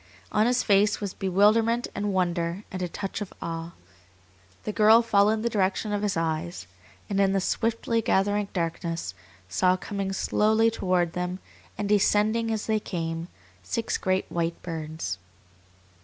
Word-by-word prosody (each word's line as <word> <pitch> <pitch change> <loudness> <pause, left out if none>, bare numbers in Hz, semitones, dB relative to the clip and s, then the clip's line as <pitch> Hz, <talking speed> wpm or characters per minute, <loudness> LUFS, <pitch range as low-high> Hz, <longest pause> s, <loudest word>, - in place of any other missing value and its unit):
On 215 +2 +3
his 250 0 +2
face 205 0 +3
was 200 -3 -4
bewilderment 215 +5 +3
and 205 0 -2
wonder 175 0 -1
and 185 - -4
a 180 - 0
touch 195 +4 -5
of 205 - -5
awe. 165 0 -5 0.9
The 215 - -2
girl 220 +2 +6
followed 215 0 +3
the - - +1
direction 205 0 0
of 205 - 0
his 205 -4 0
eyes, 165 +1 -2 0.4
and 200 -1 -1
in 195 0 +3
the 195 - +2
swiftly 230 +3 0
gathering 205 0 +1
darkness 165 - -3 0.3
saw 180 - +2
coming 195 0 -3
slowly 220 +3 +2
toward 180 -5 0
them, 180 0 -2 0.4
and 205 - -2
descending 210 +2 +3
as 220 -1 -2
they 220 -1 +1
came, 165 -3 -4 0.3
six 160 - -2
great 185 0 0
white 170 0 -1
birds. 160 - -4
195 Hz, 150 wpm, -26 LUFS, 175-215 Hz, 0.9 s, girl